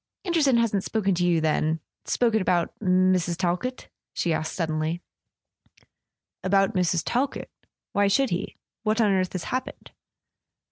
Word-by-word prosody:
"Anderson 310 -8 +3
hasn't 210 -4 +1
spoken 200 -2 0
to 175 0 0
you, 175 -2 +3
then—spoken 160 +8 0
about 175 -2 +1
Mrs. 185 -3 +2
Talkett?" 185 +9 -2 0.3
she 170 - 0
asked 155 0 -2
suddenly. 160 0 -1 1.4
"About 195 +1 +3
Mrs. 175 -2 +1
Talkett? 265 +3 -1 0.4
Why 205 0 +3
should 265 +6 +2
he? 175 - -3 0.3
Wliat 215 +1 +1
on 215 -3 +4
earth 185 -1 0
has 185 -3 -3
happened 255 +1 -5
185 Hz, 130 wpm, -25 LUFS, 175-220 Hz, 1.4 s, on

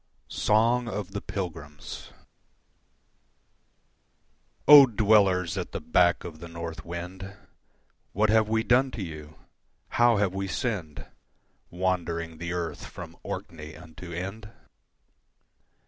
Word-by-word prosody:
Song 115 +3 +2
of 100 -3 -4
the 100 0 -4
Pilgrims 75 -7 -7 2.6
O 145 -2 +11
Dwellers 100 -6 +3
at - - -6
the - - -2
back 85 -1 +2
of 80 -3 -9
the 85 - -8
North 85 0 -7
Wind, 90 +3 -7 0.8
What 105 +2 +2
have 110 -1 +3
we 110 0 +1
done 130 +3 +3
to 105 - -3
you? 80 -3 -9 0.5
How 120 -2 +4
have 100 -2 +1
we 95 0 -3
sinned 95 - -3 0.6
Wandering 85 -3 -2
the 85 0 -4
Earth 85 -2 -4
from - - -10
Orkney 80 -1 -7
unto 85 +2 -11
Ind? 95 +5 -6
90 Hz, 115 wpm, -27 LUFS, 85-105 Hz, 2.6 s, O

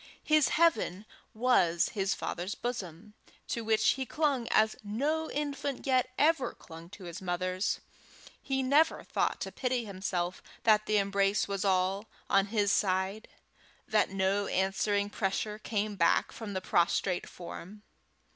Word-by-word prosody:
His 305 -2 +4
heaven 315 - +2 0.3
was 190 -8 +2
his 195 -1 -1
father's 180 +4 -4
bosom, 210 -5 -5 0.4
to 235 - -2
which 220 -1 +3
he 265 0 0
clung 280 -6 0
as 220 -1 +3
no 290 +10 -1
infant 285 -2 -3
yet 255 -2 +2
ever 310 -2 +2
clung 165 +1 -12
to 200 0 -12
his 175 +2 -7
mother's. 185 +1 -1 0.6
He 265 -1 -1
never 290 +5 +3
thought - - -1
to - - -4
pity 250 -2 -1
himself 185 -3 -3 0.2
that 215 -1 +4
the 215 - +3
embrace 200 0 +1
was 200 -2 -2
all 195 +2 +1 0.2
on 195 0 +4
his 205 -1 +1
side, 190 +2 0 0.6
that 215 -1 +2
no 195 +1 0
answering 200 +2 0
pressure 210 +2 -2
came 210 -1 -2
back 170 -3 +2
from 215 -3 -7
the 185 - -2
prostrate 175 +1 +1
form. 180 +4 -9
205 Hz, 140 wpm, -30 LUFS, 190-240 Hz, 0.6 s, His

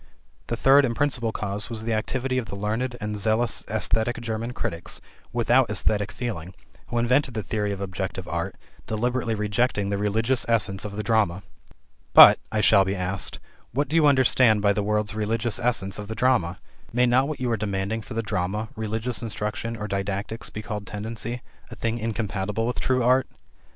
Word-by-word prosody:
The - - -2
third 140 +2 +6
and 120 -3 0
principal 125 -5 0
cause 105 0 -4
was 110 -2 -5
the 115 0 -1
activity 130 +4 -1
of 115 - -5
the 100 - -6
learned 115 +5 -2
and 105 0 -3
zealous 110 +2 +1
esthetic 110 +2 0
German 115 +1 -3
critics 85 -8 -4 0.3
without 120 +2 +3
esthetic 105 +1 0
feeling, 110 -7 -5 0.3
who 120 - -3
invented 125 +2 +2
the 110 - -2
theory 105 +1 -1
of 100 - -4
objective 95 -1 -4
art, 85 -1 -3 0.3
deliberately 120 +1 -1
rejecting 105 -1 0
the 100 - -1
religious 115 +5 +1
essence 100 -4 +1
of 100 -1 -6
the 105 - -2
drama. 105 -5 +1 0.7
"But," - - +11
I 110 - +1
shall 100 - +6
be 95 +1 -2
asked, 90 -4 -2 0.4
"what 145 +4 0
do 155 - -3
you 160 -3 +6
understand 130 -5 +4
by 100 0 +3
the 105 - -1
word's 105 0 0
religious 110 +1 -1
essence 100 -5 0
of 105 - -6
the 110 - -5
drama? 110 -8 +2 0.3
May 125 +2 +3
not 125 +3 +3
what 155 -1 -4
you 125 -2 -1
are - - +2
demanding 100 +1 -2
for 110 - -9
the 115 - -1
drama, 105 +2 -2
religious 110 +1 -2
instruction, 115 +1 -3
or 105 0 -4
didactics, 100 +3 -3
be 110 - -7
called 105 -1 -5
'tendency,' 115 +4 -5 0.3
a - - -9
thing 115 0 -2
incompatible 105 -1 -2
with 125 - -2
true 130 -1 +1
art?" 130 +2 +4
110 Hz, 185 wpm, -25 LUFS, 100-120 Hz, 0.7 s, But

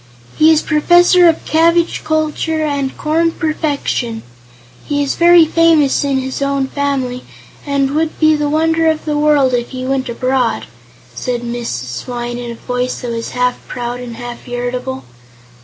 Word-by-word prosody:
"He 310 - +5
is 320 -1 +4
Professor 350 +3 +5
of 325 - -1
Cabbage 335 +1 +2
Culture 315 0 -1
and 280 -2 -2
Corn 325 +2 +1
Perfection. 285 -7 -2 0.6
He 290 -1 -1
is 280 - -1
very 345 -1 +6
famous 320 -4 +3
in 280 -1 0
his 265 +1 -4
own 275 -1 0
family, 265 -3 -2 0.4
and 275 -1 0
would 315 +2 -1
be 310 -1 +4
the 295 -1 -1
wonder 325 +2 +2
of 315 -1 0
the 300 -1 -1
world 295 -3 +3
if 240 -1 -1
he 255 -1 -6
went 265 -1 -1
abroad," 255 0 -1 0.5
said 245 -2 -3
Mrs. 125 - -4
Swyne 240 -1 -5
in 240 -1 -6
a 235 - -6
voice 250 +1 -3
that 245 - -4
was 230 0 -4
half 250 0 +1
proud 245 0 -5
and 245 -2 -7
half 240 0 -8
irritable. 245 - -4
275 Hz, 160 wpm, -16 LUFS, 245-310 Hz, 0.6 s, very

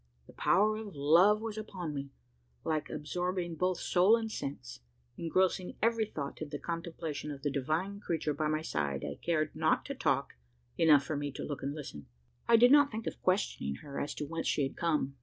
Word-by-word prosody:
The - - -16
power 215 +2 +3
of 215 -5 -7
love 170 +9 +5
was 220 -1 -4
upon 180 -7 -5
me, 140 -1 -5 0.6
alike 155 -1 -1
absorbing 175 +3 -2
both 180 +2 0
soul 190 +5 +4
and 225 -1 -3
sense 125 - -6 0.4
engrossing 185 +2 0
every 230 -1 +2
thought 140 -7 -6
in 155 - -4
the 145 - -4
contemplation 165 -2 -5
of 140 -2 -7
the 145 - 0
divine 155 +9 -1
creature 160 -6 -1
by 155 +1 -1
my 155 +1 0
side 70 - -2
I 70 0 -6
cared 155 -2 0
not - - +2
to - - -4
talk - - 0 0.4
enough 150 -4 +6
for 155 - -3
me 145 0 -2
to - - -5
look 145 - -5
and 140 +2 -3
listen. 75 - -8 0.4
I 235 - +7
did 245 +2 +7
not 285 -1 +7
think 220 -1 -5
of - - -5
questioning 185 - 0
her 140 -1 -5
as 145 - -3
to 150 - -4
whence 165 +2 -3
she 145 - +2
had 135 - -3
come. 150 -5 0
160 Hz, 200 wpm, -32 LUFS, 145-190 Hz, 0.6 s, I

